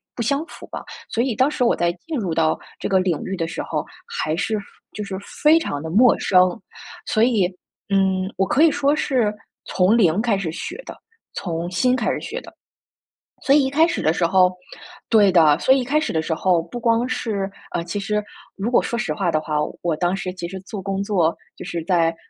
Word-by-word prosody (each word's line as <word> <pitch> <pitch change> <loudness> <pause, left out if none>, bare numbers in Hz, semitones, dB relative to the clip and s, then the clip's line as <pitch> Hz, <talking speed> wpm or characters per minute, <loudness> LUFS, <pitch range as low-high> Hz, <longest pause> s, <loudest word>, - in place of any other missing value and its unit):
不 235 - -4
相 280 +7 0
符 - - -12
吧， - - -7 0.2
所 235 - 0
以 260 -3 0
当 260 +3 +3
时 280 - -1
我 235 - +3
在 170 0 +1
进 320 - -4
入 175 -6 -2
到 160 -1 +2 0.2
这 - - -2
个 190 -1 +3
领 180 -4 0
域 190 - -3
的 165 -2 -2
时 - - -4
候， - - -2 0.2
还 155 +1 -2
是 210 +3 -1
非 200 - -11 0.3
就 210 - -5
是 195 -2 -5 0.3
非 310 +2 +7
常 145 - -3
地 160 - -5
陌 230 +8 +5
生。 185 -1 +3 0.5
所 220 - +2
以， 220 -7 +3 0.4
嗯， 190 -1 +1
我 195 - +2
可 285 - +2
以 330 - +7
说 285 +1 +2
是 245 -8 +1 0.3
从 195 +5 +3
零 185 -1 +3
开 225 -4 +1
始 175 -5 -3
学 175 - -6
的， - - -8 0.4
从 170 -1 -3
新 250 +8 +2
开 235 - 0
始 - - -2
学 - - -5
的。 - - -14 0.9
所 280 0 +4
以 295 - +5
一 265 - -2
开 320 +3 +4
始 - - -2
的 155 - +3
时 170 - +1
候 185 0 +4 0.5
对 205 -4 +5
的， 160 -4 +5
所 265 - +4
以 270 - +3
一 - - -1
开 290 +5 +1
始 315 - -2
的 160 - +1
时 160 - -2
候 175 0 +2
不 175 +9 -8
光 230 +1 +2
是 200 -6 -2 0.2
呃， 170 - -2
其 175 +4 -4
实 210 +1 -1 0.3
如 205 +4 -2
果 245 - +4
说 235 - -3
实 155 - -1
话 175 -2 0
的 155 - +1
话， 155 -1 -4 0.3
我 170 -3 0
当 175 +3 0
时 185 -1 -4
其 170 -1 -5
实 190 +1 -7
做 195 +1 -7
工 195 0 -2
作， 180 -5 +1 0.2
就 - - -8
是 170 -2 -4
在 165 -2 +2
195 Hz, 250 characters per minute, -21 LUFS, 175-235 Hz, 0.9 s, 非